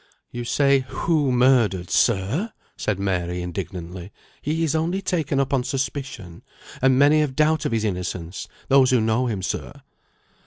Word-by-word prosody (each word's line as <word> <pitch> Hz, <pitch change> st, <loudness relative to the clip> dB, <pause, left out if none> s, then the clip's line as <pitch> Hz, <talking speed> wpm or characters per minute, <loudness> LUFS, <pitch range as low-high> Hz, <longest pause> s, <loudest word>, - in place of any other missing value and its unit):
"You 120 Hz, 0 st, -5 dB
say 140 Hz, +2 st, +3 dB
'who 155 Hz, -5 st, +1 dB
murdered,' 120 Hz, -8 st, +3 dB
sir!" 115 Hz, -, +1 dB, 0.2 s
said 105 Hz, -, -2 dB
Mary, 90 Hz, -2 st, -2 dB
indignantly. 90 Hz, +1 st, -6 dB, 0.3 s
"He 160 Hz, +3 st, -1 dB
is 160 Hz, -2 st, 0 dB
only 165 Hz, +4 st, 0 dB
taken 160 Hz, -7 st, -1 dB
up 135 Hz, +1 st, 0 dB
on 130 Hz, -2 st, +2 dB
suspicion, 130 Hz, -, -4 dB, 0.4 s
and 130 Hz, 0 st, +4 dB
many 145 Hz, +3 st, +5 dB
have 150 Hz, -1 st, +2 dB
no -, -, -21 dB
doubt 155 Hz, +1 st, +2 dB
of -, -, 0 dB
his 110 Hz, -1 st, 0 dB
innocence 90 Hz, -2 st, -4 dB, 0.2 s
those 135 Hz, -1 st, +5 dB
who 125 Hz, -, +4 dB
know 110 Hz, +3 st, +1 dB
him, 100 Hz, -5 st, -3 dB
sir." -, -, -5 dB
125 Hz, 160 wpm, -23 LUFS, 95-145 Hz, 0.4 s, many